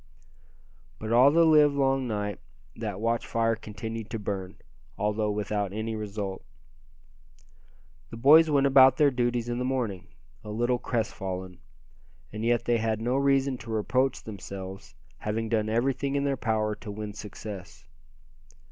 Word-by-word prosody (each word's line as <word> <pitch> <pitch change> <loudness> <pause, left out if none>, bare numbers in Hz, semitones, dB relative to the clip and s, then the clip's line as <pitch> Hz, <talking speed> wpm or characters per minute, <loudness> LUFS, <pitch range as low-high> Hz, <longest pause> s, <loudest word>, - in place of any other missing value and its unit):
But 110 0 -5
all 125 +4 +7
the 165 +3 +4
live 150 -2 +5
long 135 -2 +1
night 105 -3 -3 0.4
that 105 -4 -5
watch 115 +1 -1
fire 115 0 +1
continued 110 0 -7
to 115 - -3
burn, 100 -3 -4 0.4
although 105 +1 0
without 105 -1 -2
any 110 +1 -3
result. 100 -2 -5 1.7
The - - -8
boys 155 +7 +7
went 140 -2 +3
about 130 -1 +7
their 150 -2 +4
duties 120 -2 0
in 120 0 -2
the - - -1
morning, 120 -8 -2 0.4
a 105 - -9
little 120 +3 0
crestfallen; 95 -6 -4 0.7
and 110 +1 -5
yet 120 0 +1
they 120 -1 +2
had 110 -1 -1
no 120 +3 0
reason 135 -1 +2
to 115 - -11
reproach 125 +5 0
themselves, 95 -5 -8 0.2
having 110 +4 -2
done 110 -1 0
everything 135 +4 0
in 140 - +1
their 140 -1 +1
power 110 -3 0
to 105 - -10
win 105 0 -6
success. 100 -7 -9
115 Hz, 145 wpm, -27 LUFS, 105-130 Hz, 1.7 s, all